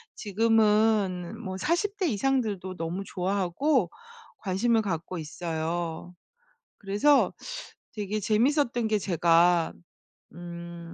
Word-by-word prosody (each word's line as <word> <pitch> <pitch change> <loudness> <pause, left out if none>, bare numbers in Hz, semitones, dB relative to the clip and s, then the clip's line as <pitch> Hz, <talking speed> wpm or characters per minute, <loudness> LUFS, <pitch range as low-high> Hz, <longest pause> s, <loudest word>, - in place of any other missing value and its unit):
지금은 215 -2 +2
뭐 185 -1 -4
40 345 - 0
대 375 - +1
이상들도 210 -6 -1
너무 165 +3 -3
좋아하고 195 - 0 0.5
관심을 220 +4 +1
갖고 180 -1 -3
있어요. 165 +1 -4 0.6
그래서 210 +9 +3 0.6
되게 210 -1 -3
재밌었던 240 +2 +2
게 215 -1 +2
제가 170 -1 +3 0.6
음 170 0 -8
195 Hz, 195 characters per minute, -27 LUFS, 175-225 Hz, 0.6 s, 그래서